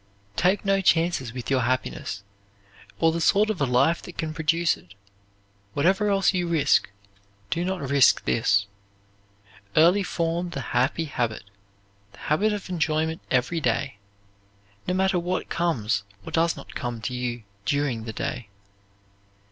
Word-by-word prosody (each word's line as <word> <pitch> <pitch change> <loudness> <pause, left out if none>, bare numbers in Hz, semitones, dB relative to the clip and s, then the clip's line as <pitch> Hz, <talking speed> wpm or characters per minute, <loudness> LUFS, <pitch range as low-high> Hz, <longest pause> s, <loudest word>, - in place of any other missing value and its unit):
Take 185 - +2
no 195 0 +3
chances 165 -8 +2
with 125 +2 -6
your 130 -1 +3
happiness, 120 -5 -2 0.7
or 165 0 +3
the 165 +1 -2
sort 210 +5 +4
of 190 - -5
a 140 - +3
life 135 +7 +3
that 180 - -11
can 155 -1 -3
produce 165 +1 +2
it; 90 +3 -18 0.8
whatever 190 +7 +2
else 195 0 +3
you 180 -2 0
risk, 165 -10 +3 0.6
do 170 - 0
not 180 -6 -2
risk 140 -1 +4
this. 100 -4 +2 1.1
Early 175 +6 +5
form 170 -1 -1
the 175 - -5
happy 130 +7 +1
habit, 120 -6 -2 0.7
the - - -17
habit 195 - +1
of 205 -2 -4
enjoyment 160 -2 -1
every 130 +6 +1
day, 115 -5 -1 0.9
no 180 - 0
matter 190 -1 +2
what 180 +2 -2
comes 120 -12 0 0.2
or - - -7
does 165 0 +2
not 140 - -11
come 120 -2 -4
to 125 - -3
you 120 -2 -3 0.2
during 135 -6 0
the 110 - -5
day. 120 -2 -4
160 Hz, 150 wpm, -25 LUFS, 125-175 Hz, 1.1 s, Early